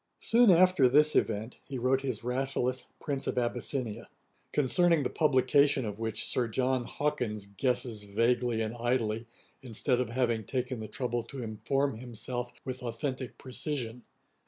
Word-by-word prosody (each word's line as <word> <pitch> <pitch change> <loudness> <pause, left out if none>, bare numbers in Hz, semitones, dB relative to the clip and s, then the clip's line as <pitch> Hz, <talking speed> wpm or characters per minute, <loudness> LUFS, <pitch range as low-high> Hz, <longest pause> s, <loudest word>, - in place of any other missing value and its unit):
] - - -51
Soon 235 -1 +5
after 180 -7 +6
this 150 +3 +5
event, 110 +2 0
he 135 - -6
wrote 130 +2 +2
his 125 -5 -3
Rasselas, 130 0 0
Prince 140 -2 -2
of - - -2
Abyssinia; 120 -1 -2 0.4
concerning 165 +3 +3
the - - -2
publication 140 -2 +3
of 105 0 -5
which 115 0 -2
Sir 125 -2 0
John 125 +2 0
Hawkins 115 -9 -2
guesses 120 +2 -1
vaguely 115 +3 +1
and 110 +1 -3
idly, 120 -2 -1 0.3
instead 125 +1 0
of 125 -3 -1
having 120 -2 0
taken 125 +2 -3
the 110 - -5
trouble 120 +2 -2
to 130 +1 -7
inform 135 +3 -1
himself 120 0 -5
with 130 -1 -4
authentick 125 +2 -4
precision. 130 -2 -4
125 Hz, 150 wpm, -30 LUFS, 115-135 Hz, 0.4 s, after